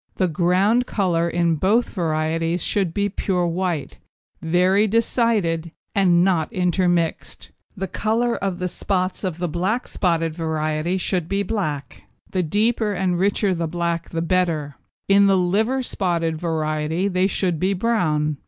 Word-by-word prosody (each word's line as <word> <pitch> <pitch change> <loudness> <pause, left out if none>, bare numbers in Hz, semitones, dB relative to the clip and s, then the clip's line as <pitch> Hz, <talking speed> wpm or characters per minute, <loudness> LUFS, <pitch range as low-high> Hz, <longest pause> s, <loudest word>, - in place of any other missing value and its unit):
The 185 - +1
ground 185 +8 +2
colour 170 -4 0
in 170 -1 +1
both 210 +9 +2
varieties 165 0 -1
should 195 -5 0
be 200 +4 0
pure 185 -2 -1
white, 170 -3 -2 0.4
very 185 +5 +3
decided, 210 -7 +1 0.2
and 180 -3 +4
not 175 -5 +1
intermixed. 175 -2 -1 0.3
The 195 0 -3
colour 230 +5 0
of 195 -3 -2
the 180 0 -2
spots 185 +1 -2
of 180 -4 -2
the 175 0 -2
black 185 +9 -1
spotted 165 -3 0
variety 160 +1 -1
should 180 -3 -1
be 200 +1 0
black, 155 - -4 0.3
the 185 - 0
deeper 210 +5 +1
and 180 -2 0
richer 200 0 +1
the 165 -2 -2
black 170 0 -2
the 165 -1 -2
better; 165 -5 0 0.3
in 200 0 +5
the 195 -1 +4
liver 220 +9 +1
spotted 170 -7 -1
variety 155 +2 -1
they 185 -1 +1
should 180 -4 -1
be 190 +3 +1
brown. 155 -9 0
180 Hz, 145 wpm, -22 LUFS, 165-195 Hz, 0.4 s, in